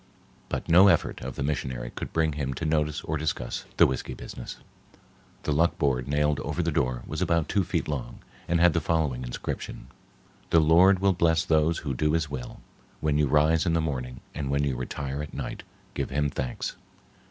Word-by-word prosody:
But - - -3
no 90 +4 +7
effort - - +2
of - - -6
the - - -3
missionary 65 -4 -3
could - - -6
bring 80 -2 +1
him 70 -2 -3
to 80 - -4
notice 75 -1 0
or 80 - -2
discuss 75 -5 -3
the - - +8
whiskey 65 - -2
business. - - -8 0.9
The - - -1
luck 80 +4 +2
board 65 -4 +1
nailed 75 0 +1
over - - -2
the - - 0
door 65 -1 0
was 80 +4 -4
about 85 -3 +2
two 100 -3 +1
feet 85 -2 -2
long 65 -5 -4 0.3
and 85 0 +2
had 85 -1 +5
the 85 - +1
following 75 -6 0
inscription: - - -5 0.6
"The 85 - +5
Lord 85 +5 +6
will 100 -1 +4
bless 85 -1 +2
those 80 +1 +3
who 70 - -1
do 75 +4 +1
his 80 -3 0
will. 65 -3 -6 0.4
When 75 -1 +1
you 75 - +3
rise 75 +4 +3
in 85 - +2
the 85 - +3
morning, 65 -5 -3
and 70 -3 -3
when 70 +1 +1
you 70 -3 0
retire 70 +2 -4
at 75 - -7
night, - - -5 0.3
give - - -2
him 75 +1 0
thanks. 65 -2 -4
75 Hz, 200 wpm, -27 LUFS, 70-80 Hz, 0.9 s, the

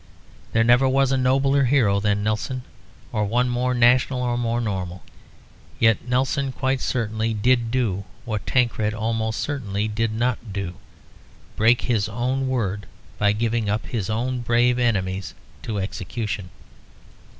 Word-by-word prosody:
There 115 - +3
never 120 +3 +5
was 135 0 +2
a - - +3
nobler 135 +2 +3
hero 120 -7 +3
than 105 0 0
Nelson, 110 +4 -2 0.5
or 105 - 0
one 120 +5 +1
more 125 +1 0
national 125 +1 +3
or 120 -1 0
more 120 -1 0
normal. 95 -5 -3 0.7
Yet 115 +1 +2
Nelson 130 +2 0
quite 130 -1 -1
certainly 110 -2 -1
did 120 +2 +2
do 115 -6 0 0.2
what 110 -3 -4
Tancred 110 -4 +1
almost 110 0 -1
certainly 110 -8 -2
did 110 +1 -1
not 120 -1 -1
do; 95 -2 -4 0.8
break 115 +3 +4
his 110 -4 0
own 130 +4 -1
word 105 -6 -2 0.3
by 105 0 +4
giving 110 0 0
up 105 +2 -1
his 110 -5 -3
own 125 +4 -1
brave 120 +1 +2
enemies 95 -6 -1 0.3
to 110 - -4
execution. 100 +1 -4
115 Hz, 140 wpm, -23 LUFS, 105-125 Hz, 0.8 s, never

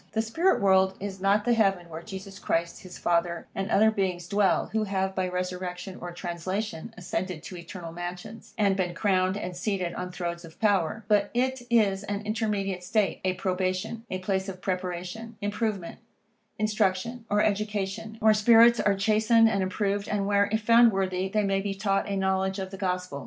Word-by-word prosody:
The 220 - +2
spirit 330 +12 +2
world 190 -1 +4
is 195 -1 -6
not 200 +2 +3
the 240 - +4
heaven 195 -6 +2
where 160 0 -7
Jesus 195 0 -9
Christ, 170 +1 -1
his 185 -1 -10
Father, 170 0 0
and 195 +1 -3
other 220 +1 +5
beings 185 -5 -2
dwell, 200 -1 +2
who 220 -1 +1
have, 190 -1 -1
by 185 -1 -1
resurrection 180 +1 -4
or 175 - -5
translation, 180 +3 -4
ascended 180 -2 -4
to 185 - -8
eternal 170 0 -8
mansions, 175 +5 -8
and 200 -3 +3
been 180 -3 -1
crowned 185 0 +1
and 180 -3 -5
seated 180 -1 -2
on 180 0 -5
thrones 175 -1 -4
of 165 -1 -13
power; 205 -1 +1
but 205 -1 +3
it 260 +1 0
is 205 -5 +3
an 205 0 -3
intermediate 205 -4 -1
state, 205 +2 0
a 185 0 +1
probation, 185 +4 -2
a 185 - -2
place 190 +1 -2
of 185 -1 -7
preparation, 185 +4 -4
improvement, 205 -3 -3 0.6
instruction, 215 +2 0
or 205 0 +3
education, 210 +1 -2
where 220 0 +6
spirits 230 +2 +6
are 200 - +3
chastened 220 +3 +4
and 205 -3 +1
improved, 200 +2 -1
and 205 -1 -1
where, 200 0 +2
if 220 +1 +1
found 230 +1 +6
worthy, 190 -1 -1
they 210 +2 +1
may 195 -1 +1
be 195 0 -3
taught 195 0 0
a 200 - -1
knowledge 190 0 0
of 190 -1 -5
the - - -6
Gospel. 180 -6 -2
195 Hz, 185 wpm, -27 LUFS, 185-210 Hz, 0.6 s, where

